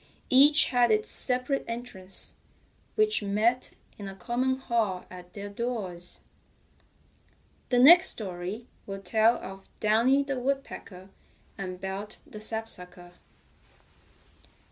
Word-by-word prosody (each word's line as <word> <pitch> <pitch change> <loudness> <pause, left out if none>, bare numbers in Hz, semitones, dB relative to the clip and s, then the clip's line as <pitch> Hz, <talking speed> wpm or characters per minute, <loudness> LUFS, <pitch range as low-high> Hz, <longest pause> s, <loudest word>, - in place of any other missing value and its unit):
Each 290 +4 +6
had 245 -2 +3
its 215 -1 +2
separate 255 +2 +3
entrance, 230 -6 -4 0.6
which 430 - +2
met 215 +5 0 0.3
in 200 - -6
a 195 - -8
common 250 +5 -1
hall 225 -8 -1
at 180 -1 -12
their 200 0 -7
doors. 200 -5 -5 1.5
The 245 - +2
next 345 +9 +8
story 190 +2 -5 0.2
will 195 0 -7
tell 220 +4 +3
of 195 0 -10
Downy 235 +6 +3
the 275 -2 -3
Woodpecker 245 -8 -5 0.5
and 185 -2 -6
Belt 195 +2 -6
the 215 - -11
Sapsucker. 180 -5 -5
220 Hz, 110 wpm, -27 LUFS, 195-250 Hz, 1.5 s, next